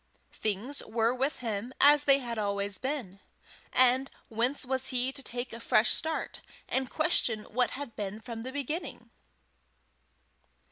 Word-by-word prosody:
Things 220 Hz, +7 st, -2 dB
were 225 Hz, +1 st, +1 dB
with 265 Hz, +3 st, -1 dB
him 230 Hz, +2 st, -3 dB
as 290 Hz, 0 st, +7 dB
they 275 Hz, -1 st, +6 dB
had 240 Hz, -4 st, -4 dB
always 200 Hz, -1 st, -2 dB
been, 260 Hz, -9 st, -4 dB, 0.5 s
and 255 Hz, +1 st, +4 dB, 0.2 s
whence 245 Hz, +5 st, 0 dB
was 265 Hz, +1 st, +3 dB
he 255 Hz, 0 st, +1 dB
to 275 Hz, -, -8 dB
take 245 Hz, -1 st, -5 dB
a 230 Hz, -, -6 dB
fresh 230 Hz, -1 st, +3 dB
start, 320 Hz, 0 st, -3 dB, 0.3 s
and 260 Hz, -1 st, -1 dB
question 280 Hz, -8 st, +1 dB
what 245 Hz, +3 st, 0 dB
had 280 Hz, -5 st, -7 dB
been 205 Hz, 0 st, -4 dB
from 225 Hz, 0 st, -7 dB
the 255 Hz, +3 st, -5 dB
beginning? 285 Hz, +5 st, -5 dB
250 Hz, 145 wpm, -30 LUFS, 225-270 Hz, 0.5 s, as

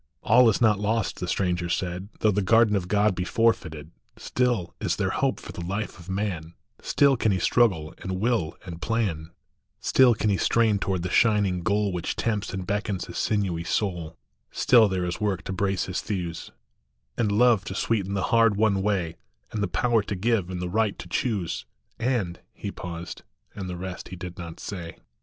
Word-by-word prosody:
" -, -, -47 dB
All 125 Hz, -2 st, +7 dB
is 110 Hz, -, +1 dB
not 110 Hz, -4 st, +4 dB
lost," 110 Hz, 0 st, -1 dB
the 90 Hz, -, -3 dB
stranger 90 Hz, -2 st, 0 dB
said, 90 Hz, +2 st, -2 dB
" -, -, -27 dB
Though 110 Hz, -, +4 dB
the 105 Hz, +1 st, +1 dB
garden 110 Hz, +2 st, +4 dB
of 90 Hz, -3 st, -1 dB
God 105 Hz, +2 st, +3 dB
be 90 Hz, -, -2 dB
forfeited; 85 Hz, -9 st, 0 dB, 0.3 s
Still 120 Hz, -8 st, 0 dB
is -, -, 0 dB
there -, -, 0 dB
hope -, -, 0 dB
for -, -, -9 dB
the 85 Hz, -, -7 dB
life 100 Hz, +3 st, -4 dB
of 85 Hz, +2 st, -12 dB
man, 95 Hz, -5 st, -3 dB, 0.3 s
Still 140 Hz, -1 st, +3 dB
can 110 Hz, -3 st, +1 dB
he 95 Hz, -, +1 dB
struggle 90 Hz, -6 st, +2 dB
and 95 Hz, -1 st, -4 dB
will 110 Hz, -8 st, 0 dB
and 85 Hz, -2 st, -8 dB
plan, 95 Hz, -9 st, -1 dB, 0.5 s
Still 125 Hz, -3 st, +5 dB
can 105 Hz, 0 st, +1 dB
he 95 Hz, -, +2 dB
strain 110 Hz, -1 st, +2 dB
toward 95 Hz, -3 st, -1 dB
the 90 Hz, -, -3 dB
shining 105 Hz, -5 st, +3 dB
goal 105 Hz, +1 st, +1 dB
Which 85 Hz, -2 st, -2 dB
tempts 110 Hz, -2 st, -1 dB
and 95 Hz, -1 st, -4 dB
beckons 100 Hz, -1 st, -2 dB
his -, -, -6 dB
sinewy 95 Hz, -6 st, 0 dB
soul; 85 Hz, -3 st, -2 dB, 0.3 s
Still 120 Hz, -3 st, +5 dB
there 95 Hz, -2 st, -1 dB
is 90 Hz, +4 st, -4 dB
work 100 Hz, -3 st, 0 dB
to 95 Hz, -, -4 dB
brace 95 Hz, 0 st, 0 dB
his 95 Hz, -, -3 dB
thews, 90 Hz, -5 st, -4 dB, 0.7 s
And 110 Hz, -4 st, +1 dB
love 115 Hz, -1 st, +4 dB
to 95 Hz, -, -5 dB
sweeten 100 Hz, -2 st, 0 dB
the 95 Hz, -, 0 dB
hard 115 Hz, -2 st, +5 dB
won 100 Hz, -2 st, +2 dB
way, 95 Hz, -5 st, -1 dB, 0.3 s
And 110 Hz, -, -3 dB
the 100 Hz, -, +1 dB
power 115 Hz, +6 st, +2 dB
to 100 Hz, 0 st, -4 dB
give, 100 Hz, -1 st, 0 dB
and 90 Hz, -1 st, -4 dB
the 90 Hz, -, -3 dB
right 105 Hz, +2 st, 0 dB
to -, -, -8 dB
choose, 95 Hz, -, -2 dB, 0.3 s
And 115 Hz, -9 st, -1 dB
" -, -, -48 dB
He -, -, -6 dB
paused; 85 Hz, -1 st, -7 dB, 0.3 s
and 95 Hz, -3 st, -6 dB
the 90 Hz, -, -4 dB
rest 90 Hz, 0 st, -6 dB
he 90 Hz, -, -8 dB
did 90 Hz, 0 st, -8 dB
not 85 Hz, -2 st, -7 dB
say. 85 Hz, -4 st, -6 dB
95 Hz, 200 wpm, -26 LUFS, 90-110 Hz, 0.7 s, All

